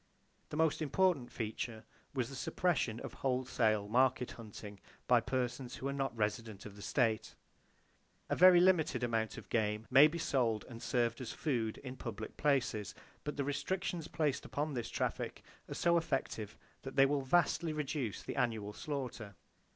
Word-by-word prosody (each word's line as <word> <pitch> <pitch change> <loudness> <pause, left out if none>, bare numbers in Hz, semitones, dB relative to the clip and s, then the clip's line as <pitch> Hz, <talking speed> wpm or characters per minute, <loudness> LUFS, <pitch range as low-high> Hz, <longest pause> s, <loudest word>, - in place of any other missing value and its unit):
The 150 - -4
most 160 0 +2
important 155 -4 +2
feature 110 0 -4 0.3
was 125 -3 0
the 135 - -8
suppression 130 -6 0
of - - -6
wholesale 125 -5 +1
market 125 +2 +2
hunting, 105 -3 -9 0.3
by 120 -2 +5
persons 125 +1 -2
who 135 - -4
are 140 - -1
not 135 -4 -2
residents 105 -1 -2
of 105 -2 -9
the 100 - -11
state. 115 -2 0 0.9
A - - 0
very 180 0 +8
limited 170 -8 +3
amount 115 -2 0
of - - -9
game 105 -1 0
may 140 +3 +9
be 160 +2 -4
sold 120 -9 +1
and 115 -2 -9
served 120 -1 0
as 120 - -4
food 120 -8 -1
in 130 -1 -7
public 110 -3 -6
places, 130 - 0 0.3
but 150 -1 -4
the 140 - +1
restrictions 170 +4 -2
placed 150 -3 0
upon 150 +1 -2
this 120 -3 -3
traffic - - -2 0.3
are - - -4
so 170 0 +3
effective 135 -9 -2 0.2
that 135 - -7
they 135 - +7
will 140 0 +1
vastly 165 +3 +2
reduce 145 - -3
the - - -5
annual 110 -5 0
slaughter. 125 -9 -5
125 Hz, 165 wpm, -34 LUFS, 110-145 Hz, 0.9 s, may